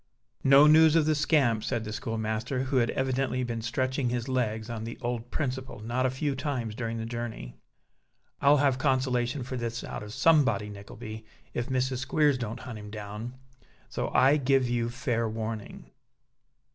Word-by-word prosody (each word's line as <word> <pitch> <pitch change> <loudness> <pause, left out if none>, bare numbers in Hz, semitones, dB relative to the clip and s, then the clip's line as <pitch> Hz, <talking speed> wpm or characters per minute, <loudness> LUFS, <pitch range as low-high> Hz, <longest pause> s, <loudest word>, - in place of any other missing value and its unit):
"No 140 +2 +7
news 160 +1 +7
of 160 -2 +4
the 155 - +3
scamp!" 140 -7 +2
said 120 -3 -1
the 110 -1 -5
schoolmaster, 110 +4 -2
who 135 0 0
had 120 -2 +3
evidently 130 -1 0
been 115 -2 -3
stretching 130 +2 -1
his 120 0 -2
legs, 110 -4 -1
on 115 -2 -5
the 115 +1 -6
old 120 -1 -3
principle, 130 -5 -3
not 120 +4 0
a - - 0
few 135 +2 -2
times 130 -5 -3
during 115 0 -3
the 110 - -4
journey. 115 - -5 0.9
"I'll 145 +1 +6
have 135 -2 +2
consolation 130 -1 +1
for 130 +1 -5
this 120 0 -3
out - - -6
of 105 0 -8
somebody, 130 -7 +3
Nickleby, 110 +2 -9 0.3
if 120 0 -2
Mrs. 130 0 0
Squeers 140 +1 +2
don't 115 -2 -4
hunt 115 -4 -7
him 105 0 -9
down. 105 +3 -7 0.5
So - - -2
I 140 +3 +5
give 135 -2 +2
you 120 -1 0
fair 120 -2 -1
warning." 110 -1 -6
125 Hz, 170 wpm, -28 LUFS, 115-130 Hz, 0.9 s, No